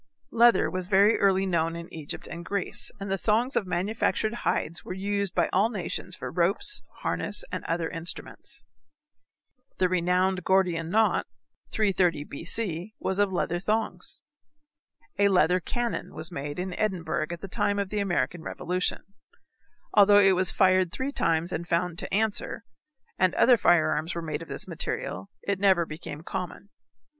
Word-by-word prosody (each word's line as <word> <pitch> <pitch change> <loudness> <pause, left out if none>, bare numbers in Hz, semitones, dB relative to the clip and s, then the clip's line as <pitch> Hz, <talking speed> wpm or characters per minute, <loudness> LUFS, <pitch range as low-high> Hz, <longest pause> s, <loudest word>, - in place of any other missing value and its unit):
Leather 235 +1 +5
was 185 -1 -3
very 200 +3 +5
early 195 -1 +3
known 165 -3 0
in 170 0 -7
Egypt 155 -3 -6
and 170 0 -7
Greece, 200 +3 -3
and 195 -1 -5
the 195 - 0
thongs 230 +5 +1
of 200 - 0
manufactured 215 +4 0
hides 170 -8 -1
were 185 - -6
used 200 0 -2
by - - +3
all 205 +4 +3
nations 185 -3 -2
for - - -6
ropes, 195 - +1 0.2
harness, - - 0
and - - -4
other 165 0 -1
instruments. 165 +2 -1 1.1
The 185 - +3
renowned 180 +1 +1
Gordian 175 -3 +2
knot, 220 +4 +2 0.4
330 185 -7 +1
B. 140 0 -8
C., 190 0 -2
was 190 +1 -2
of 205 -1 +3
leather 175 -1 -1
thongs. 215 +4 -2 1.0
A 200 - +5
leather 180 -2 +4
cannon 240 +6 -3
was 160 +3 -4
made 145 -2 -5
in 180 0 -3
Edinburgh 175 -6 -1
at 170 -1 -6
the 195 - -6
time 205 +2 0
of 200 -1 -1
the 210 - -2
American 175 -3 -1
revolution. 180 +3 -2 0.9
Although 205 -1 +7
it 195 -1 +6
was 185 -1 +2
fired 185 -2 +3
three 265 +7 -3
times 165 - 0
and 170 -1 -4
found 175 0 0
to - - -4
answer, 220 +2 -1 0.6
and 185 -1 +3
other 250 - +6
firearms 175 -4 +2
were 170 - -3
made 155 -1 -3
of 165 - -8
this - - -7
material, 95 +1 -3
it 200 -1 -1
never 190 -4 +4
became 155 -1 -8
common. 190 +2 -6
185 Hz, 160 wpm, -27 LUFS, 170-200 Hz, 1.1 s, Although